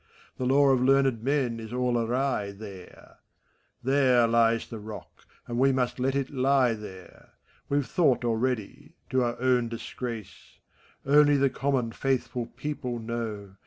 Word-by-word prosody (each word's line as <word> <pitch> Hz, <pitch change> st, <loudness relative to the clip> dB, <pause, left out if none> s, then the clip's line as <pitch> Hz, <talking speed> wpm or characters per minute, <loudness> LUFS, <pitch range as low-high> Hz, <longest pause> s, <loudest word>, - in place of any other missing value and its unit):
The 130 Hz, -, -2 dB
lore 140 Hz, +1 st, +5 dB
of 130 Hz, -, +1 dB
learned 135 Hz, -3 st, +3 dB
men 130 Hz, -3 st, 0 dB
is 110 Hz, -1 st, -8 dB
all 125 Hz, 0 st, 0 dB
awry 120 Hz, -2 st, 0 dB
there; 100 Hz, -3 st, -12 dB, 0.7 s
There 130 Hz, -2 st, +4 dB
lies 115 Hz, 0 st, +2 dB
the 115 Hz, -, -7 dB
rock, 105 Hz, 0 st, -11 dB, 0.2 s
and 120 Hz, 0 st, -3 dB
we 135 Hz, +1 st, +4 dB
must 125 Hz, -1 st, -1 dB
let 135 Hz, +2 st, 0 dB
it 140 Hz, -1 st, -1 dB
He -, -, -15 dB, 0.5 s
there; 95 Hz, -3 st, -12 dB, 0.4 s
We've 140 Hz, -1 st, +1 dB
thought 130 Hz, -2 st, +2 dB
already— 125 Hz, -, -2 dB, 0.2 s
to 130 Hz, -1 st, +2 dB
our 120 Hz, -1 st, -1 dB
own 125 Hz, -2 st, +2 dB
disgrace. 115 Hz, -3 st, -7 dB, 0.5 s
Only 145 Hz, +1 st, +5 dB
the 135 Hz, -1 st, +2 dB
common, 135 Hz, -4 st, -1 dB
faithful 125 Hz, -1 st, -2 dB
people 130 Hz, -3 st, -5 dB
know. 110 Hz, -4 st, -5 dB
125 Hz, 145 wpm, -27 LUFS, 115-135 Hz, 0.7 s, lore